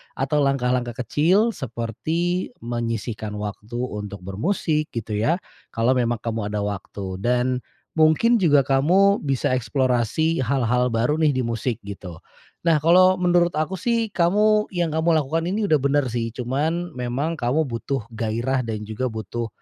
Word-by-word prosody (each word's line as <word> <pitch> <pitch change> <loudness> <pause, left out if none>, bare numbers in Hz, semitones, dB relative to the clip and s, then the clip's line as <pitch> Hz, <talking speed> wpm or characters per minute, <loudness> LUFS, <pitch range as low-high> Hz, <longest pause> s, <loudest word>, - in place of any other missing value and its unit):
atau 140 +3 0
langkah-langkah 125 -3 0
kecil, 180 - +3
seperti 140 - -2
menyisihkan 115 -2 -3
waktu 105 +2 -6
untuk 105 -5 -5
bermusik, 155 - -1
gitu 110 -2 -3
ya. 155 +11 +2 0.4
Kalo 115 +2 +1
memang 120 -1 +1
kamu 110 -3 -2
ada 105 -1 -1
waktu. 100 -1 -5
Dan, 125 +2 +1 0.4
mungkin 190 +10 +4
juga 145 -7 +4
kamu 175 +10 +3
bisa 135 -3 0
eksplorasi 130 +5 +1
hal-hal 125 -1 +1
baru 120 +7 +1
nih, 150 -4 +3
di 130 - 0
musik 115 0 -2
gitu. 100 -3 -8 0.5
Nah 165 -2 +4
kalo 185 +4 +5
menurut 175 -1 +3
aku 155 +5 -1
sih, 230 +3 0
kamu, 210 +5 +3
yang 170 -4 -1
kamu 160 +1 +2
lakukan 155 +3 -1
ini 205 +3 0
udah 155 - +4
benar 140 0 +2
sih, 115 -1 -2
cuman, 150 +8 -2
memang 130 +7 -2
kamu 140 +4 0
butuh 125 +1 -3
gairah 115 +4 -1
dan 110 -2 -4
juga 110 +4 -2
butuh, 110 +2 -4
130 Hz, 145 wpm, -23 LUFS, 115-165 Hz, 0.5 s, kalo